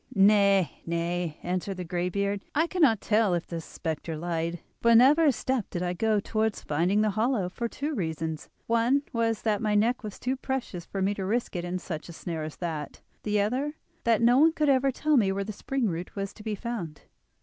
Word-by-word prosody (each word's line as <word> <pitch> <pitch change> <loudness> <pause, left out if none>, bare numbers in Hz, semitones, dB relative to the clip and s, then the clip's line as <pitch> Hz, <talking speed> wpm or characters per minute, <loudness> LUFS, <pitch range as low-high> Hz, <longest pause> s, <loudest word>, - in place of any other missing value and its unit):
"Nay, 200 -4 +4
nay," 170 -1 -2
answered 185 +2 -2
the 180 - -4
greybeard. 185 +3 -1
"I 315 +3 +4
cannot 300 - +3
tell 210 -4 +2
if 170 - -2
the 170 -1 -5
spectre 160 0 -5
lied, 170 +1 -2 0.2
for 235 0 +5
never 285 +7 +6
a 290 - +6
step 255 -2 -2
did 175 - -3
I 180 0 -1
go 215 +3 +1
towards 220 +1 -1
finding 175 +8 +1
the 215 -1 +2
hollow, 215 -2 0
for 235 +6 -3
two 290 +6 -4
reasons:—one 200 - -1
was 230 -2 0
that 215 -2 +1
my 210 -2 +1
neck 230 +4 +2
was 210 -2 -6
too 255 +1 -1
precious 255 -10 -4
for 195 -1 -2
me 200 +2 +2
to 200 - -4
risk 220 +3 -1
it 175 - -2
in 175 +1 -2
such 165 -3 -6
a - - -8
snare 165 -1 -5
as 155 -1 -6
that; 160 -4 -5 0.2
the 210 -1 +1
other, 260 +8 -1 0.3
that 230 -1 +3
no 245 +3 +6
one 320 +2 +6
could 300 -2 +1
ever 270 0 +4
tell 300 +3 +2
me 200 -5 +3
where 200 +1 -1
the 215 +2 -6
spring 270 +4 -2
root 175 -1 -4
was 195 -1 -4
to - - -13
be 215 -1 -3
found." 200 -9 -5
205 Hz, 210 wpm, -27 LUFS, 175-235 Hz, 0.3 s, never